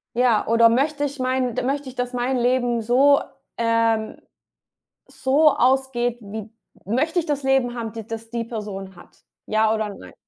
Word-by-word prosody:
Ja, 240 -3 +2
oder 230 0 +5
möchte 285 +5 +1
ich 280 -1 -3
mein 255 -1 0
d - - 0
möchte 280 +2 -2
ich, 260 - -9
dass 250 0 -3
mein 250 +1 0
Leben 245 -1 +1
so, 270 +5 +4 0.4
ähm 230 -1 +1 0.9
so 295 +4 +3
ausgeht, 250 -2 +1
wie 215 0 -8 0.3
möchte 300 - 0
ich 330 - -8
das 290 -2 -2
Leben 265 -2 +2
haben, 230 -2 -5
d 225 0 -6
das 225 +1 -8
die 235 -1 -3
Person 205 -4 -7
hat. 175 - -18 0.2
Ja 215 0 +2
oder 215 -1 -2
nein? 90 - -13
240 Hz, 170 wpm, -22 LUFS, 225-265 Hz, 0.9 s, oder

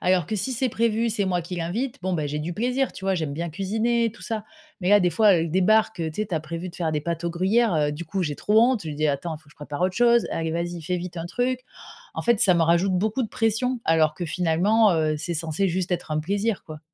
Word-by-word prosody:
alors 180 -3 +2
que 215 - -3
si 210 +6 -2
c'est 255 +2 0
prévu, 230 0 +1
c'est 215 -3 0
moi 180 -2 0
qui 175 +2 -6
l'invite, 225 +11 -3
bon, 185 -1 -1
bah 155 -3 -1
j'ai 150 +1 -3
du 170 +3 -4
plaisir, 250 +6 0
tu 190 - -10
vois? 195 0 +2
J'aime 160 -5 -2
bien 170 +4 -3
cuisiner 225 +7 0
et - - -1
tout - - -15
ça. 220 -2 -3 0.4
Mais 180 - -1
là, 205 0 +7
des 180 - +3
fois, 210 -2 +5
elle 165 -1 0
débarque, 215 +2 +3
heu, 160 -1 -1
tu - - -13
sais, - - -4
tu 185 - -4
as 155 - 0
prévu 170 +3 -6
de 175 - -12
faire 165 -3 -1
des 150 -1 -1
pâtes 170 +2 -3
aux 170 - -1
gruyères, 195 +4 +2
heu, 150 -1 +1
du 165 +4 -6
coup, 185 +3 -2
j'ai 150 -1 -2
trop 215 +7 +3
honte. 245 -2 +3
Je 160 - -6
lui 150 - -5
dis: 155 +1 +1
«Attends, 155 +3 -2
faut 155 - -19
que 150 - -21
je - - -20
prépare 145 +1 -7
autre 185 0 +1
chose». 235 -1 +4
Allez, 165 0 -2
vas 170 +1 -1
y, 175 -1 -5
fais 180 +3 -1
vite 175 0 -6
un 165 - -4
truc. 250 +6 -1 0.5
En - - -3
fait, 235 -3 +2
ça 190 -6 +5
me 170 - +3
rajoute 170 +4 +3
beaucoup 215 +7 0
de 225 - -3
pression 230 +3 0
alors 160 -1 +3
que 175 - -4
finalement, 185 +7 +3
heu, 155 -2 +1
c'est 170 +3 -4
censé 165 +4 -1
juste 180 +1 -1
être 175 -2 -3
un 155 - 0
plaisir 200 +6 -1
quoi. 155 -1 -9
180 Hz, 290 wpm, -24 LUFS, 165-220 Hz, 0.5 s, là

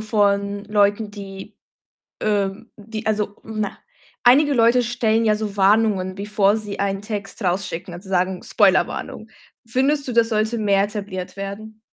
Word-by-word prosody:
von 200 -1 0
Leuten, 205 0 +1
die, 200 0 -9 0.6
ähm 205 +1 -1
die, 220 +1 -7
also 210 -1 -1
na, 215 -2 -4 0.4
einige 285 +4 +5
Leute 235 +1 +4
stellen 230 -1 +1
ja 215 -1 +4
so 210 -1 -4
Warnungen, 195 -2 +3
bevor 205 +1 +1
sie 210 -2 -6
einen 195 0 -1
Text 205 0 -6
rausschicken, 180 -1 -2
also, 185 +3 -11
sagen: 185 0 0
„Spoilerwarnung.“ 210 +2 +1 0.4
Findest 270 +4 0
du, 250 - -2
das 230 -1 +3
sollte 220 +1 0
mehr 200 -2 +3
etabliert 200 -3 -6
werden? 210 +2 -7
210 Hz, 140 wpm, -21 LUFS, 195-220 Hz, 0.6 s, einige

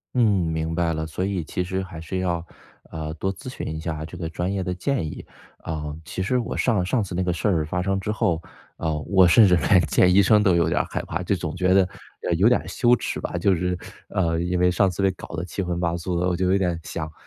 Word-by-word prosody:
嗯， 125 - +3 0.3
明 80 0 -2
白 85 -1 +1
了。 80 0 -3
所 80 +4 -3
以， 95 -3 -2
其 90 +3 -3
实 95 +1 -2
还 95 -4 -9
是 85 +3 -4
要， 85 -2 -1 0.5
呃， 80 -1 -4
多 95 +4 -2
咨 95 +7 -9
询 125 - -6
一 - - -5
下 80 -1 -4
这 80 +3 -9
个 85 -2 -4
专 90 +3 -2
业 100 -1 -1
的 90 0 -2
建 125 - -1
议。 75 - -7 0.3
啊， 75 -2 -5
其 95 - -4
实 125 +7 +1
我 120 - -2
上 105 -8 +1
上 115 +4 +1
次 95 - -7
那 90 - 0
个 90 -1 0
事 85 - -1
儿 80 -5 +1
发 90 +4 -2
生 95 +1 0
之 95 - -5
后， 85 -6 0 0.4
呃， 80 -2 -1
我 95 +1 +4
甚 110 +6 +7
至 90 -2 +5
连 90 +2 +4
见 90 +4 +3
医 100 - +7
生 105 +2 +5
都 95 -4 +4
有 85 -2 +2
点 85 - +1
儿 - - 0
害 - - -2
怕， 85 - -4
就 90 +2 0
总 80 -3 -4
觉 90 0 +3
得， 95 -1 +5 0.4
呃， - - 0
有 95 +6 +4
点 125 - +3
羞 120 0 +3
耻 - - -4
吧。 - - -4
就 95 +3 +3
是 90 +1 -1 0.3
呃， 85 -3 0
因 90 +1 -1
为 90 0 +4
上 95 +2 +3
次 90 +2 -3
被 95 - +4
搞 90 - -10
得 85 - -3
七 90 +2 -4
荤 90 -2 -2
八 85 -1 0
素 85 +1 -2
的， 90 - +1
我 90 - +1
就 90 +1 0
有 95 - +4
点 90 -4 0
想： 80 0 -5
90 Hz, 290 characters per minute, -24 LUFS, 85-95 Hz, 0.5 s, 甚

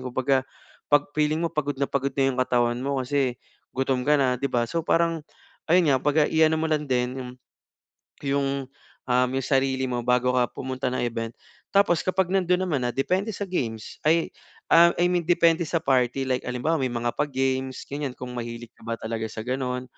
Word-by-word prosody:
Kumbaga, 130 +1 +1 0.5
'pag 145 0 +4
feeling 155 +1 +2
mo 170 - +1
pagod 145 -2 -1
na 140 - +1
pagod 140 0 0
na 135 - +4
'yung 130 - -5
katawan 120 -1 +1
mo 140 0 -1
kasi 130 -1 0 0.4
gutom 130 -1 0
ka 150 - +5
na 130 -2 +2
'di 140 - 0
ba. 120 -1 +1
So, 170 - 0
parang 165 -1 +2 0.5
ayun 175 -1 +5
nga 130 - +3
'baga 150 +1 +3
i-ano 160 0 +4
mo 160 - 0
lang 150 -1 0
din 125 0 0
'yung 125 -1 -6 1.0
'yung 140 0 +1 0.6
um, 125 0 +2
'yung 135 - -1
sarili 135 -1 +1
mo 125 -1 -2
bago 125 0 +3
ka 125 -1 +3
pumunta 130 0 -4
ng 130 - -2
event. 115 -1 -3 0.4
Tapos 195 -4 +4
kapag 185 -1 0
nandun 180 -1 +2
naman 155 -8 -1
na, 120 - 0
depende 185 +10 0
sa - - -3
games. 115 -11 -4
Ay, 165 +1 +3 0.4
ah, 170 +1 +8
I 175 - +3
mean 175 -1 +1
depende 170 -1 +4
sa 165 - 0
party, 130 0 +2
like 130 -1 0
halimbawa 125 +6 0
may 130 - +1
mga 120 0 -1
pa-games 130 -2 -1
ganiyan, 140 -2 -4
kung 125 0 -7
mahilig 120 0 -6
ka - - -24
ba 115 - -1
talaga 110 0 -4
sa 110 +1 -6
gano'n. 125 0 -2
135 Hz, 195 wpm, -25 LUFS, 125-155 Hz, 1.0 s, ah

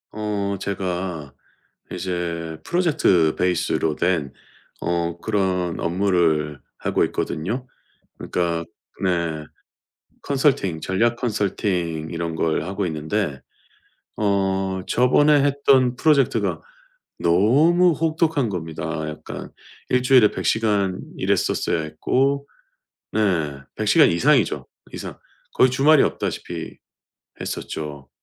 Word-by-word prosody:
어 105 -2 -2
제가 90 -6 -4 0.6
이제 85 -3 -3
프로젝트 135 - +2
베이스로 85 -3 0
된 85 -6 0 0.5
어 85 0 -1
그런 95 -5 -1
업무를 85 -5 +1 0.2
하고 - - +1
있거든요. 115 +11 -3 0.5
그러니까 85 -1 -1 0.4
네 85 -4 -1 0.8
컨설팅 135 - +1
전략 115 +8 +1
컨설팅 95 -8 -1
이런 85 -1 -3
걸 80 -1 0
하고 95 +2 -2
있는데 80 -1 -2 0.8
어 95 -2 0
저번에 145 +4 +4
했던 135 -3 +3
프로젝트가 145 -3 +2 0.6
너무 145 - +4
혹독한 160 -4 +1
겁니다. 80 -5 -5 0.3
약간 75 - -8 0.4
일주일에 125 -3 +5
100 - - -5
시간 105 -4 +1 0.2
일했었어야 80 - 0
했고, 135 - 0 0.6
네 85 -10 0 0.2
100 - - -3
시간 - - +6
이상이죠, 85 0 +2 0.3
이상. - - -7 0.3
거의 130 - +5
주말이 140 +3 +5
없다시피 - - -4 0.7
했었죠. 75 -3 -6
95 Hz, 215 characters per minute, -22 LUFS, 85-125 Hz, 0.8 s, 시간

